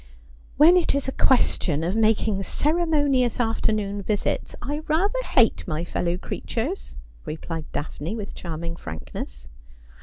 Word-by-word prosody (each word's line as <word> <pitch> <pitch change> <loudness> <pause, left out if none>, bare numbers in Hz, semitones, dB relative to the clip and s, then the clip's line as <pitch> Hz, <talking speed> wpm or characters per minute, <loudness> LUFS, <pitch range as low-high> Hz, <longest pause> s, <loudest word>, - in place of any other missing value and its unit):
' - - -25
When 330 +5 +8
it 345 - +2
is 280 -1 -1
a - - 0
question 175 - +2
of 180 +4 0
making 220 -2 +2
ceremonious 290 - +1
afternoon 215 -3 0
visits, 205 +1 -1
I 290 +4 -3
rather 395 +10 +1
hate 240 - +3
my 155 -1 -2
fellow 175 0 -1
creatures,' 245 - -4 0.3
replied 160 0 -6
Daphne, 155 +5 -4
with 210 -3 -6
charming 165 0 -5
frankness. 75 - -7
220 Hz, 130 wpm, -24 LUFS, 170-280 Hz, 0.3 s, When